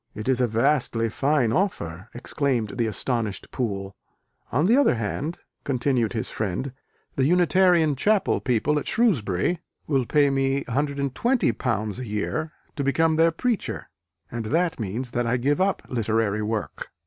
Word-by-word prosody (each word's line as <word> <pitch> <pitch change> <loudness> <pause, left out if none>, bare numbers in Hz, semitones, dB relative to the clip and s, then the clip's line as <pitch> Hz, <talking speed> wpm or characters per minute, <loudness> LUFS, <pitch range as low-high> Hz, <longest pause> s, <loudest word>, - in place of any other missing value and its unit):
"It 110 +2 -6
is 130 -1 +2
a 125 - +3
vastly 115 -1 +1
fine 135 0 +1
offer!" 105 - -2
exclaimed 120 -3 -1
the 115 - +2
astonished 110 -2 -2
Poole. 100 -5 -3 0.6
"On 145 +7 +2
the 225 +6 +5
other 280 - +4
hand," 125 +9 -3 0.3
continued 125 -4 0
his 110 - -3
friend, 110 +6 -3 0.4
"the 130 - +3
Unitarian 175 -1 +4
Chapel 205 +9 +2
people 130 +5 +1
at - - -7
Shrewsbury 165 - +1 0.3
will 135 -5 0
pay 145 -2 +3
me 135 0 +1
£120 140 - 0
a 130 - -5
year 105 +10 -2 0.2
to 145 - -2
become 160 +4 +2
their 165 +1 +4
preacher: 230 +6 -2 0.4
and 115 -2 -4
that 165 +8 0
means 115 +4 -4
that 120 -1 -1
I 125 +2 +2
give 145 +7 +1
up 195 +1 +1
literary 110 -3 0
work. 105 -2 -3
130 Hz, 150 wpm, -24 LUFS, 115-155 Hz, 0.6 s, the